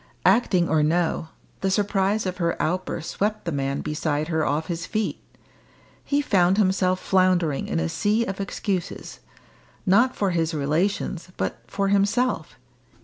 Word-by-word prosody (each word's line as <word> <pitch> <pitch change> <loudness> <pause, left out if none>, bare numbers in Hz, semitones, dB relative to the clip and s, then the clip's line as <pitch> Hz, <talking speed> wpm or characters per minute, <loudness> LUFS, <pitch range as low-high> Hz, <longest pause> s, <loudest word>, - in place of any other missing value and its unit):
Acting 185 -7 +4
or 160 -2 +2
no, 165 +1 +1 0.3
the 195 - 0
surprise 200 +1 +1
of 185 -1 -3
her 170 -2 -1
outburst 175 -1 -2
swept 210 0 -1
the 170 - -1
man 140 -1 -1
beside 150 0 -2
her 160 -2 +1
off 150 +3 0
his 170 -1 -4
feet. 215 -1 -2 0.8
He 285 0 +1
found 185 -6 +3
himself 185 -2 +2
floundering 185 -7 +2
in 80 - -1
a 80 - 0
sea 210 - +1
of 195 -1 -4
excuses 195 - -4 0.7
not 235 +7 +4
for 200 -2 0
his 165 -1 0
relations, 170 +4 -1
but - - -2
for 195 0 -1
himself. 200 0 +1
185 Hz, 145 wpm, -24 LUFS, 160-200 Hz, 0.8 s, Acting